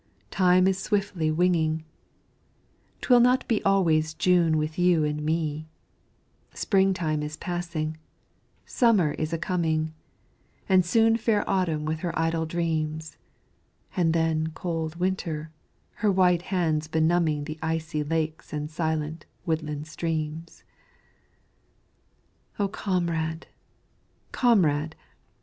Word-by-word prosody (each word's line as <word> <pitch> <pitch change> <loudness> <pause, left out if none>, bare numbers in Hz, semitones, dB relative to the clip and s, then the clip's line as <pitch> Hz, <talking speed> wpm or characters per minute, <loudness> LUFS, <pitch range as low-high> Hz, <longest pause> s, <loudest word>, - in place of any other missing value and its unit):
Time 185 -1 +4
is 190 -1 +1
swiftly 195 -6 -1
winging, 160 -1 +1 1.2
'Twill 245 -2 +5
not 250 +2 +3
be 225 -3 0
always 160 -5 +2
June 170 -2 +3
with 155 +2 -2
you 175 -3 +4
and 150 0 -1
me; 155 0 -2 0.9
Spring 195 -1 +2
time 155 -5 -1
is 150 +1 -5
passing 165 -3 -3 0.7
Summer 210 - +3
is 155 +2 -3
a 165 - 0
coming, 160 -3 -1 0.7
And 185 -2 +5
soon 225 +5 +3
fair 220 -2 0
Autumn 170 -6 0
with 155 0 -2
her 170 +1 -3
idle 165 0 0
dreams, 160 -2 -2 0.8
And 175 -4 +2
then 160 -1 +1
cold 165 -2 -3
Winter, 170 -4 -2 0.5
her 210 -2 +2
White 180 -2 +3
hands 165 -5 -1
benumbing 160 -1 +1
The 155 +1 -7
icy 160 -1 -2
lakes 160 +1 -3
and 150 0 -4
silent, 160 -1 -3 0.2
woodland 155 -3 -2
streams! 160 0 -4 1.9
O 205 - +1
Comrade! 170 -5 -2 0.9
Comrade! 160 - +2
165 Hz, 110 wpm, -26 LUFS, 155-180 Hz, 1.9 s, Twill